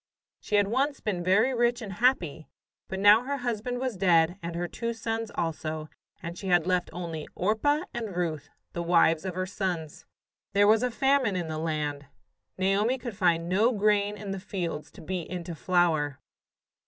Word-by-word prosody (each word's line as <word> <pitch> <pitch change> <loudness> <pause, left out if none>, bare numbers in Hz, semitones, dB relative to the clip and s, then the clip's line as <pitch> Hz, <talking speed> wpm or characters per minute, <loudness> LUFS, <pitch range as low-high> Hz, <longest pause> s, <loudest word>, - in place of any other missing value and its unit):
She 210 - -2
had 205 -1 +4
once 270 +6 0
been 185 -5 -2
very 215 +8 +3
rich 240 0 +2
and 210 -5 -6
happy, 185 - +1 0.4
but 190 - -4
now 205 +3 +7
her 280 +3 -3
husband 245 -1 -2
was 255 -3 -2
dead 175 -1 +3
and 170 0 -5
her 175 +1 -2
two 235 +5 -3
sons 225 0 -3
also, 155 -1 -3 0.3
and 170 +1 -5
she 195 - -7
had 175 -3 +3
left 180 -1 +1
only 165 -3 -5
Orpah 290 - +1
and 225 -6 -4
Ruth, 165 -4 -2 0.2
the 170 - -3
wives 170 -1 +3
of 185 -2 -3
her 185 0 -1
sons. 180 -5 -4 0.5
There 200 +1 +5
was 220 +1 +5
a 250 - +1
famine 265 -3 +2
in 175 -3 -2
the 155 0 -3
land. 150 -3 -2 0.5
Naomi 200 +7 +2
could 240 -4 -6
find 170 -4 +2
no 205 +7 +3
grain 205 -1 +2
in 205 -1 -6
the 195 - -3
fields 175 -6 -4
to - - -12
beat 175 0 -4
into 175 -1 -5
flour. 160 -5 +1
190 Hz, 180 wpm, -28 LUFS, 170-225 Hz, 0.5 s, now